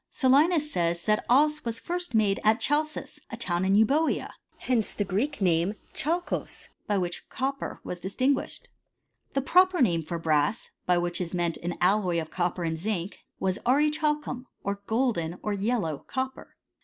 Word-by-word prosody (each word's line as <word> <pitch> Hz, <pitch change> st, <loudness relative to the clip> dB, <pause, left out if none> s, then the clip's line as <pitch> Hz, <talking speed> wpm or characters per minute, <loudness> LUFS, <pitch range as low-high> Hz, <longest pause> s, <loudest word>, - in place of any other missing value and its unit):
Solinus 300 Hz, +4 st, +3 dB
says, 170 Hz, -3 st, 0 dB
that 215 Hz, 0 st, +2 dB
cea 300 Hz, +4 st, +4 dB
was 230 Hz, -1 st, -3 dB
first 350 Hz, -4 st, -3 dB
made 205 Hz, -3 st, +3 dB
at 215 Hz, +2 st, +4 dB
Chalcis, 305 Hz, +2 st, -1 dB
a -, -, -6 dB
town 175 Hz, 0 st, -1 dB
in 190 Hz, +1 st, +3 dB
Eubcea. 280 Hz, +10 st, +2 dB, 0.3 s
Hence 235 Hz, -4 st, 0 dB
the 205 Hz, -, 0 dB
Greek 215 Hz, +7 st, -1 dB
name, 175 Hz, +2 st, +2 dB, 0.2 s
"xblKko^ 340 Hz, +4 st, 0 dB, 0.2 s
(chalkos)y -, -, -11 dB, 0.2 s
by 205 Hz, -, +1 dB
which 175 Hz, -2 st, -3 dB
copper 275 Hz, +1 st, -3 dB
was 180 Hz, -, -5 dB
distinguished. 260 Hz, -, -1 dB, 0.7 s
The 275 Hz, -, 0 dB
proper 365 Hz, +5 st, +4 dB
name 175 Hz, -10 st, +3 dB
for 165 Hz, +2 st, -4 dB
brass, 155 Hz, +5 st, 0 dB, 0.2 s
by 180 Hz, -1 st, +4 dB
which 175 Hz, +1 st, -1 dB
is 180 Hz, 0 st, -3 dB
meant 170 Hz, -2 st, 0 dB
an 175 Hz, 0 st, -4 dB
alloy 180 Hz, -2 st, +2 dB
of 160 Hz, -1 st, -6 dB
copper 175 Hz, 0 st, -1 dB
and 160 Hz, -1 st, -2 dB
zinc, 195 Hz, -1 st, -3 dB, 0.2 s
was 190 Hz, 0 st, 0 dB
aurichalcuniy 295 Hz, -1 st, +1 dB, 0.2 s
or 200 Hz, 0 st, -2 dB
golden, 220 Hz, -8 st, 0 dB
or 210 Hz, -, -1 dB
yellow 200 Hz, -, -1 dB
copper. 260 Hz, 0 st, -4 dB
215 Hz, 165 wpm, -27 LUFS, 175-275 Hz, 0.7 s, cea